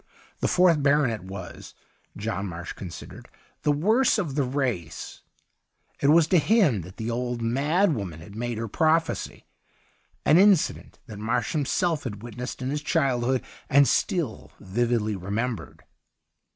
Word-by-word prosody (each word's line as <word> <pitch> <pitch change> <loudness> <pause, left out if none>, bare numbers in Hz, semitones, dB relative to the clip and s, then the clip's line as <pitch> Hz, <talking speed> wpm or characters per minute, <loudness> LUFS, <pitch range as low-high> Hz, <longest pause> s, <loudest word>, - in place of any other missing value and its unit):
The - - +1
fourth 175 -4 +4
baronet 140 -8 +2
was, 95 -1 -9 0.4
John 100 -2 -3
Marsh 85 0 -6
con 95 - -8
sidered, - - -10 0.3
the 150 - +2
worst 215 - +3
of 170 -10 -2
the 145 - +1
race; 125 - -3 0.8
it 140 - +3
was 160 +2 +6
to 180 - +5
him 160 - +3
that 90 +3 -12
the 115 +1 -3
old 120 0 -2
mad 150 - +2
woman 95 - -5
had 85 +5 -12
made 120 0 -3
her 115 +1 -3
prophecy, 160 +7 0 0.8
an 155 +4 +6
incident 195 -4 +3
that 105 -3 -9
Marsh 115 +1 -1
himself 155 +2 0
had 105 -3 -6
witnessed 125 +2 -6
in 130 - -2
his 150 0 -2
childhood 130 -5 +1 0.3
and 140 0 +6
still 160 - -1
vividly 110 +1 0
remembered. 105 +5 -4
125 Hz, 145 wpm, -26 LUFS, 110-150 Hz, 0.8 s, was